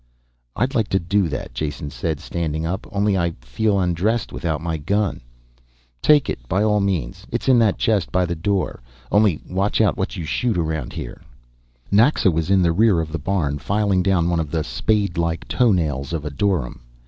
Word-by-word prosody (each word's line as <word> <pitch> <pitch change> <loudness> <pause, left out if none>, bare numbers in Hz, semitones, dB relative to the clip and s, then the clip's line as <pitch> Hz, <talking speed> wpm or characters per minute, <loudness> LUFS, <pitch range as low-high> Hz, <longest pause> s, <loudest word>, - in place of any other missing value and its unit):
"I'd 130 +3 0
like 110 -6 +1
to 95 - +1
do 95 +2 +1
that," 70 -4 -5
Jason 75 -1 -4
said, 80 -2 -3
standing 80 -1 -3
up. 95 +5 -3
"Only 100 -1 +1
I 85 -3 0
feel 100 - 0
undressed 95 +6 0
without 80 -3 -2
my 80 0 -3
gun 100 +4 -1 0.4
" - - -38
"Take 150 -2 +5
it, - - -3
by 95 +3 +2
all 105 -1 +3
means, 90 -11 -2
it's - - -3
in 130 -2 +6
that 110 -4 +3
chest 105 -6 +1
by 90 0 +2
the 85 - -2
door. 95 0 -1 0.3
Only 105 -6 +3
watch 95 +3 0
out 110 -2 +3
what 95 - -2
you 85 - -4
shoot 115 +6 0
around 80 -5 -2
here." - - -7 0.7
Naxa 110 -1 +4
was 80 +1 -1
in 95 -1 +4
the 85 -1 +3
rear 105 -1 +4
of 80 -1 -3
the 85 - -3
barn, 75 -4 -1
filing 100 +6 +1
down 90 -2 +2
one 85 -1 +1
of 80 -3 -2
the 80 0 -1
spadelike 85 - -1
toenails 80 - +1
of 80 -2 -3
a 75 - -3
dorym. 75 -5 -1
90 Hz, 195 wpm, -21 LUFS, 80-100 Hz, 0.7 s, in